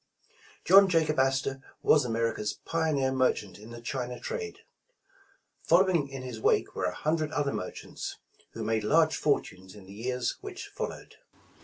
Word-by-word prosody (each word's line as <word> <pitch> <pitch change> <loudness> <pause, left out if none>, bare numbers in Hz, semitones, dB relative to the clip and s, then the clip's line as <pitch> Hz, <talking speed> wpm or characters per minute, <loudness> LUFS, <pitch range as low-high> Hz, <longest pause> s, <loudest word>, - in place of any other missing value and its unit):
John 195 +2 +8
Jacob 160 -4 +2
Astor 135 0 +1 0.2
was 150 -4 +5
America's 115 -2 -1
pioneer 155 -5 +1
mer 130 -1 +3
chant 100 -1 -9
in 110 +2 -12
the 120 0 -9
China 125 -2 -4
trade. 455 -2 -5 1.0
Following 170 -3 +3
in 135 -1 -7
his 120 -4 -7
wake - - +2
were - - -2
a 90 0 -1
hundred 155 0 0
other 145 -2 0
merchants, 90 - -6 0.4
who 115 - -5
made 110 0 0
large 155 +6 +4
fortunes 95 -11 -1
in 100 -2 -13
the 95 - -12
years 125 +4 -2
which 385 -2 -7
followed. - - -6
135 Hz, 155 wpm, -29 LUFS, 115-160 Hz, 1.0 s, John